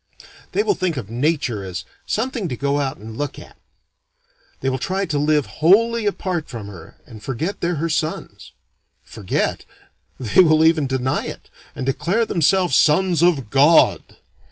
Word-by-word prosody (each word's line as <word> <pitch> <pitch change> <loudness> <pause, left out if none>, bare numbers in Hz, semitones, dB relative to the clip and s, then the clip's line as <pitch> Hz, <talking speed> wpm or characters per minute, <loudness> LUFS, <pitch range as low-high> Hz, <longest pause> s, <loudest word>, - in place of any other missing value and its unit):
They 415 - +2
will 415 - +2
think 180 - -2
of 110 -4 -6
Nature 125 -4 -1
as 90 -2 -6 0.2
"something 225 -3 -2
to 125 - -4
go 140 +1 0
out 140 0 -2
and 110 +1 -10
look 145 +2 -4
at." - - -13 1.1
They - - -2
will 130 0 0
try 195 +6 -2
to 150 -5 -2
live 150 0 +2 0.2
wholly 225 +6 +4
apart 185 -5 -3
from 115 -5 -7
her 80 -5 -12
and 110 -3 -13
forget 150 - -4
they're 175 +1 0
her 160 +2 -2
sons. 155 0 -4 0.5
Forget? 100 -4 -3 0.6
They 130 - +4
will 155 -2 +4
even 160 -3 +3
deny 130 0 -1
it, - - -9 0.2
and 130 - -4
declare 170 - 0
themselves 180 0 +2
sons 170 +2 +3
of 145 -11 +2
God. 145 +4 +5
155 Hz, 160 wpm, -20 LUFS, 130-180 Hz, 1.1 s, God